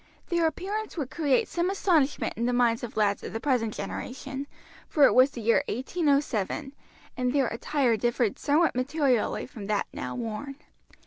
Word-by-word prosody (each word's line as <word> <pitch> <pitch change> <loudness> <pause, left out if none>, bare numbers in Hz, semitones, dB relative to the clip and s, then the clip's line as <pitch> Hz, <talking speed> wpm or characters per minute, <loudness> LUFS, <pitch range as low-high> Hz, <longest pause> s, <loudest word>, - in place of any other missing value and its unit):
Their 340 -2 +2
appearance 405 +5 -4
would 280 -5 -3
create 320 - +2
some 345 +1 -1
astonishment 335 -8 +1
in 235 +1 -1
the 245 - +1
minds 240 -1 +2
of 235 - -6
lads 205 -2 +2
of - - -7
the 225 - -2
present 245 -5 +1
generation, 265 +7 -6 0.4
for 295 - +3
it - - +5
was 255 +2 +6
the 245 - -8
year 230 +5 +3
1807, 275 - 0 0.4
and 250 -1 0
their 270 -3 +2
attire 245 0 +1
differed 240 -1 0
somewhat 310 +4 +3
materially 255 -2 0
from 205 -4 -9
that 210 -1 0
now - - -5
worn. 245 +4 -5
265 Hz, 170 wpm, -27 LUFS, 230-300 Hz, 0.4 s, was